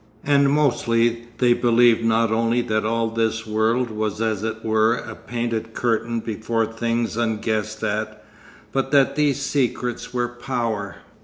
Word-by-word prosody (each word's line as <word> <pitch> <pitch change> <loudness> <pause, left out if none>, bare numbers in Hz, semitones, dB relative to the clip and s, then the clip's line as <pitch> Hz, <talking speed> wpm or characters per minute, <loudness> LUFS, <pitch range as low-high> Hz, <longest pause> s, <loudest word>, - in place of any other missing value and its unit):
And 140 -1 +3
mostly 120 -5 +1
they 125 -1 +4
believed 120 -1 +4
not 115 0 +2
only 115 +2 +2
that 110 -3 -1
all 115 +1 0
this 115 0 -1
world 110 +3 +1
was 110 -1 -3
as 110 -3 -1
it 110 0 -4
were 110 +1 +3
a 115 -1 -7
painted 115 -1 -4
curtain 115 -1 0
before 110 +1 -1
things 115 0 -2
unguessed 110 -1 -1
at, 110 0 -3 0.5
but 135 -1 -1
that 140 -1 +3
these 145 -2 +1
secrets 125 -3 -2
were 120 -1 0
Power. 120 -5 -3
115 Hz, 145 wpm, -22 LUFS, 110-120 Hz, 0.5 s, they